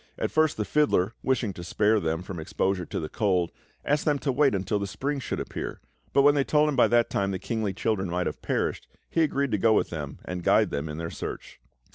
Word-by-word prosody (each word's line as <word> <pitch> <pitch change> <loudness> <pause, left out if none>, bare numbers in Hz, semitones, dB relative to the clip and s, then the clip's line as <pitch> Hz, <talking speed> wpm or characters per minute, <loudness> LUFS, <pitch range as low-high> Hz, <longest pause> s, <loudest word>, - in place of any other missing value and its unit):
At - - -2
first 155 -1 +2
the 105 - -1
fiddler, 115 -9 +2
wishing 130 -6 0
to 85 - -8
spare 105 +5 +2
them 80 -1 -2
from 95 -2 -6
exposure 90 +3 -1
to - - -3
the 80 - -4
cold, 90 -3 0 0.3
asked 145 +1 +1
them 150 -2 +2
to 140 0 -1
wait 135 -3 +3
until 100 +2 -1
the 100 - -3
spring 140 +8 -3
should - - -3
appear; - - -5 0.3
but 140 - +4
when 145 +1 +7
they 140 -1 +2
told 150 +2 +3
him - - 0
that 125 - +4
by - - +6
that 120 0 +2
time 100 0 0
the 95 - -2
kingly 110 +1 -2
children 95 -1 -1
might 90 +1 -1
have - - -4
perished, - - -1 0.2
he 165 - +2
agreed 140 -4 +1
to 105 - +1
go 110 +2 +4
with - - +1
them 75 -3 -5
and 90 0 -5
guide - - +4
them 70 +2 -3
in 75 - -5
their 80 0 -4
search. - - -7
105 Hz, 245 wpm, -27 LUFS, 90-140 Hz, 0.3 s, when